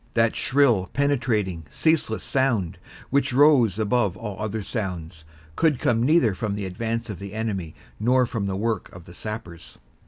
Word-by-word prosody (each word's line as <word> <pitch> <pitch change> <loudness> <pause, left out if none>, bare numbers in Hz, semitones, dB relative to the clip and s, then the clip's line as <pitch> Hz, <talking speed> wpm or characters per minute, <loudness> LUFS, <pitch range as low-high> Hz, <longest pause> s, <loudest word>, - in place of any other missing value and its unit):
That 115 -1 +3
shrill, 125 -9 +2
penetrating, 115 - 0
ceaseless 160 - +1
sound, 120 -10 0 0.3
which 140 0 +2
rose 130 -7 +5
above 110 -2 +1
all 105 -4 -6
other 110 0 -3
sounds, 85 -7 -5 0.3
could 155 -5 +2
come 115 -1 +1
neither 140 - +4
from 100 +1 -3
the 100 -1 -4
advance 115 +4 -3
of 95 - -8
the 100 0 -8
enemy 100 -8 -3 0.2
nor 125 +3 +3
from 110 -4 -3
the 95 -1 -2
work 110 -1 -2
of 90 -2 -12
the 85 - -13
sappers. 90 -5 -8
110 Hz, 160 wpm, -24 LUFS, 95-125 Hz, 0.3 s, rose